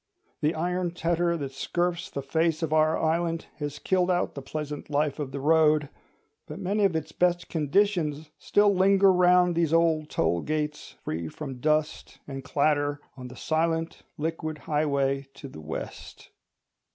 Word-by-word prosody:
The 150 +2 +1
iron 175 +1 -1
tetter 170 0 +1
that 140 -3 -5
scurfs 175 +5 -2
the 140 - -5
face 160 +3 0
of 155 -1 -1
our 155 0 +3
island 165 +1 0
has 145 -1 -4
killed 185 +1 +1
out 180 -1 +1
the 140 - -7
pleasant 150 +1 -6
life 150 0 0
of 140 -3 -4
the 140 - -4
road; 155 0 +3 0.6
but - - -7
many 200 +2 +1
of 185 -4 +1
its 160 - -3
best 175 -1 +1
conditions 160 -2 0
still 205 0 +3
linger 195 +1 +5
round 180 0 +4
these 165 -2 +1
old 160 -2 +2
toll 85 +1 0
gates, 150 -1 -3
free 80 +1 -3
from 135 - -7
dust 155 +2 -1
and 135 -1 -6
clatter, 145 +1 +1 0.2
on 125 -2 -8
the 125 - -11
silent 165 +1 -1 0.2
liquid 160 0 -3
Highway 140 -3 0
to 140 - -9
the 80 - -11
West. 80 +1 -8
155 Hz, 160 wpm, -27 LUFS, 145-170 Hz, 0.6 s, linger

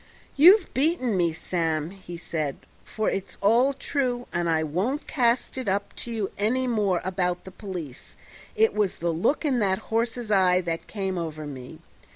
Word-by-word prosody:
"You've 360 +7 +7
beaten 265 - +1
me, 175 -2 +2
Sam," 160 -1 -2
he 185 -3 -9
said, 155 -5 -3 0.3
"for 215 -1 -3
it's 195 - -5
all 235 +7 +4
true, 255 -3 -2
and 175 -1 0
I 160 -1 +2
won't 195 - -1
cast 250 -1 +1
it 255 - -5
up 200 +2 -2
to - - -6
you 215 -4 -2
any 250 +5 +1
more 210 -7 +1
about 180 -1 -1
the 190 - -10
police; 175 - -8 0.4
it 445 0 +3
was 210 -3 0
the 170 0 -1
look 230 - +1
in 265 -4 +2
that 190 -3 +2 0.2
horse's 230 0 -1
eye 185 -2 +4
that 165 -2 -4
came 190 -3 -3
over 155 -2 -5
me. 130 -3 -8
195 Hz, 175 wpm, -26 LUFS, 170-245 Hz, 0.4 s, You've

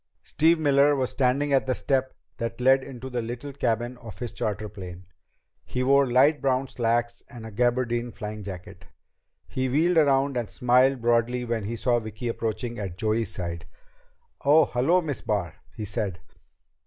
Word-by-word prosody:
Steve 165 +1 +3
Miller 145 -1 +4
was 130 -2 -1
standing 140 +2 +1
at 135 -1 +2
the 130 - +1
step 130 -1 -1 0.2
that 115 0 -4
led 130 +1 +4
into 130 -1 -8
the 125 -2 -2
little 120 +5 -6
cabin 120 -1 -1
of 110 -6 -10
his 120 +1 -5
charter 105 0 -3
plane. 95 -3 -9 0.6
He 125 - -3
wore 135 -1 +4
light 140 +5 +4
brown 135 0 +1
slacks 120 -1 -1
and 120 -4 -10
a 110 - -8
gabardine 120 +1 0
flying 105 -2 -7
jacket. 95 -3 -9 0.6
He 130 0 -2
wheeled 165 +6 +2
around 140 -2 +2
and 120 -3 -2
smiled 125 +1 +3
broadly 120 +1 +1
when 115 -3 -2
he 115 +3 -3
saw 120 +1 +1
Vicki 110 +1 -5
approaching 115 +1 -3
at 95 -4 -5
Joey's 110 +2 0
side. 85 -2 -5 0.8
"Oh, 150 +3 +6
hello, 140 +9 +2
Miss 150 -5 -4
Barr," 95 -7 -2 0.2
he 110 - -5
said. 95 -3 -3
120 Hz, 165 wpm, -26 LUFS, 110-135 Hz, 0.8 s, Oh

